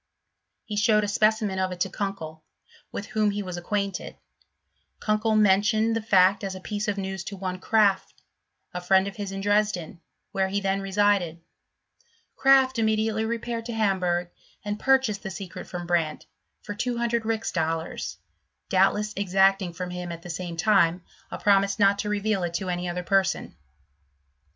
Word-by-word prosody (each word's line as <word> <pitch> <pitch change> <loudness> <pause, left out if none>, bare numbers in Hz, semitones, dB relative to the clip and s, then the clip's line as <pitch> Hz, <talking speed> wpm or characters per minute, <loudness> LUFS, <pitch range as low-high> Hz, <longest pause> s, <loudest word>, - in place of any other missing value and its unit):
He 210 - -5
showed 210 0 +3
a - - -1
specimen 215 -1 +1
of 185 0 0
it 180 - -6
to - - +1
Kunkel, 160 -6 -5 0.5
with 200 - -5
whom 215 -1 +1
he 205 0 -2
was 180 -2 -5
acquaint 200 +2 -2
ed: - - -10 0.8
Kunkel 215 +1 +1
mentioned 215 +2 +3
the 225 - -1
fact 200 -2 +4
as 190 -1 -3
a - - -7
piece 210 +2 -4
of 205 -1 -1
news 190 -1 -4
to 200 - -6
one 185 -1 -4
Kraft, 205 -1 +2 0.6
a 180 - -4
friend 190 +2 +3
of 200 - -7
his 200 -2 -4
In 195 0 -5
Dresden, 205 -5 0 0.3
where 190 0 +1
he 200 +1 -1
then 195 0 -1
Sesided: 195 -4 +1 1.0
Kraft 265 -2 +4
immediately 220 0 +1
repaired 230 0 -3
to 235 - -4
Hamburg, 180 -5 0 0.3
and 205 0 -3
purchased 265 -7 +2
the 195 - -5
secret 190 -1 -8
from 175 -1 -6
Brandt 170 -3 -1 0.4
for 205 - -5
200 235 0 -1
rix 225 0 -2
dol 165 -1 0
lars, 160 - -6 0.5
doubtless 210 +2 +2
exacting 195 -1 +2
from 180 +1 -6
him, 180 -1 -5
at 170 0 -8
the 175 - -6
same 170 0 -5
time, 180 -2 +3 0.3
R - - -5
promise 200 0 +3
not 200 -1 +4
to 210 - -2
reveal 210 -1 0
it 170 -1 -3
to 190 0 -2
any 175 0 -2
other 180 +1 -3
person, 195 0 +1
Sw^n. - - -29
195 Hz, 175 wpm, -26 LUFS, 180-215 Hz, 1.0 s, fact